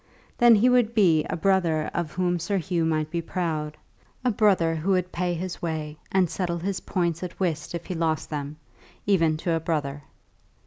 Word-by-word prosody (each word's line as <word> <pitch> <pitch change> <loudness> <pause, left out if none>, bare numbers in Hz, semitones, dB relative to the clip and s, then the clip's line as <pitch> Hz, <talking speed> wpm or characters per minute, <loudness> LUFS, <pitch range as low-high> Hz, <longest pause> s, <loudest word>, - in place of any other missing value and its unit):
Then 240 -1 +7
he 220 +4 +4
would 245 -2 +3
be 170 -8 +4
a - - -3
brother 170 -4 +1
of 170 -3 -3
whom 175 -1 0
Sir 195 +4 -1
Hugh 175 -2 -1
might 155 -1 0
be 170 -1 -1
proud; 160 -3 -3 0.5
a 250 - +4
brother 190 -6 +3
who 185 +5 +1
would 180 -1 0
pay 175 0 -1
his 180 +2 -5
way, 155 -3 -3 0.2
and 190 -2 +3
settle 175 0 -2
his 185 +2 -2
points 170 -2 -1
at 180 -2 -7
whist 170 -3 -2
if 170 - -6
he 185 - -4
lost 160 -2 -1
them, 145 0 -4 0.5
even 165 -6 +3
to 165 +1 -1
a 165 - +1
brother. 150 -3 -2
170 Hz, 190 wpm, -25 LUFS, 160-185 Hz, 0.5 s, Then